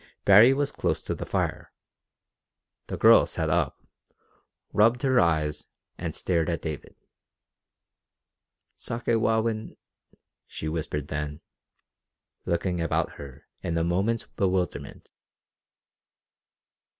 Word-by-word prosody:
Baree 105 +6 +8
was 140 +1 0
close - - -2
to - - -3
the - - -6
fire. - - -2 1.2
The - - -4
girl - - +6
sat 80 -1 -2
up, 80 -5 -1 0.9
rubbed 115 +5 +3
her 130 -2 +4
eyes, 80 -3 +1 0.3
and - - -5
stared 85 -2 0
at 85 - -3
David. 80 -3 -6 1.8
"Sakewawin," 115 -1 -1 0.7
she 80 - -6
whispered 75 -2 -3
then, 75 +1 -4 1.1
looking 85 0 -1
about 85 - -1
her 70 -3 -11 0.2
in 85 - -2
a 80 - +1
moment's 95 +7 0
bewilderment. 95 -3 -2
85 Hz, 100 wpm, -26 LUFS, 80-110 Hz, 1.8 s, Baree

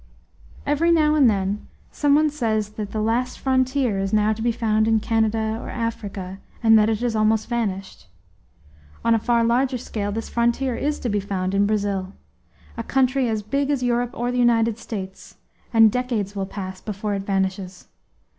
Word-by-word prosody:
Every 305 +4 +2
now 305 -2 +4
and 285 -5 +5
then 200 0 -2 0.2
some 290 -1 +2
one 305 0 +3
says 220 -7 -1
that 210 -1 -6
the 215 - -3
"last 240 +3 0
frontier" 260 -4 +1
is 195 0 -2
now 215 0 +3
to 220 - -7
be 235 +1 +2
found 220 -2 +1
in 225 -1 +3
Canada 220 0 0
or - - -7
Africa, 200 -5 -4 0.2
and 225 -1 +6
that 210 +1 +3
it 220 0 -1
has 240 -2 0
almost 215 0 +2
vanished. 195 - -3 1.0
On 230 - +4
a 225 - +3
far 235 +1 +2
larger 250 +3 +2
scale 210 -4 -4
this 225 +2 -4
frontier 235 +2 0
is 295 +4 -1
to 245 - -2
be 205 -1 +1
found 190 -1 -3
in 200 +1 +3
Brazil 200 -2 -1 0.6
a - - -2
country 260 0 +1
as 215 -2 -2
big 275 +6 -1
as 280 -3 0
Europe 245 0 +1
or 240 +1 -1
the 250 - -1
United 230 -2 +3
States 190 -4 -7 0.4
and 225 -2 +6
decades 230 -5 -2
will 195 -1 -2
pass 190 -2 -7
before 210 0 -3
it 200 - -2
vanishes. 190 -1 -3
225 Hz, 185 wpm, -23 LUFS, 205-245 Hz, 1.0 s, and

